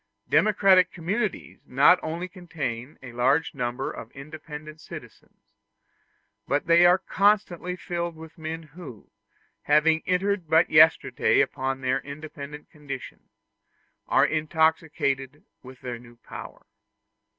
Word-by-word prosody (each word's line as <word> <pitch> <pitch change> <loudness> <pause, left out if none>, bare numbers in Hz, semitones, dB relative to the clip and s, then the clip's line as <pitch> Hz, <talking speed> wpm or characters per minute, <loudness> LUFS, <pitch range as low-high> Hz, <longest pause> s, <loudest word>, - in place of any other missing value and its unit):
Democratic 195 -4 +4
communities 195 +5 -3
not 140 +7 +5
only 165 +3 -4
contain 150 - -6
a 125 - -9
large 135 +6 +1
number 125 -1 -3
of 115 - -9
independent 150 +1 -10
citizens, - - -13 0.9
but 145 +1 0
they 170 +1 +6
are 180 +1 +5
constantly 190 -2 +1
filled 170 0 -4
with 160 0 -12
men 160 -1 -6
who, 150 - -12 0.5
having 160 +2 +3
entered 185 -1 0
but 160 +1 +5
yesterday 155 +1 +4
upon 135 0 -1
their 130 +1 0
independent 145 0 -9
condition, 140 -4 -9 0.8
are - - +4
intoxicated 155 -3 0 0.2
with 130 0 -14
their 125 -2 -6
new 120 0 -16
power. 115 - -11
155 Hz, 115 wpm, -25 LUFS, 135-175 Hz, 0.9 s, they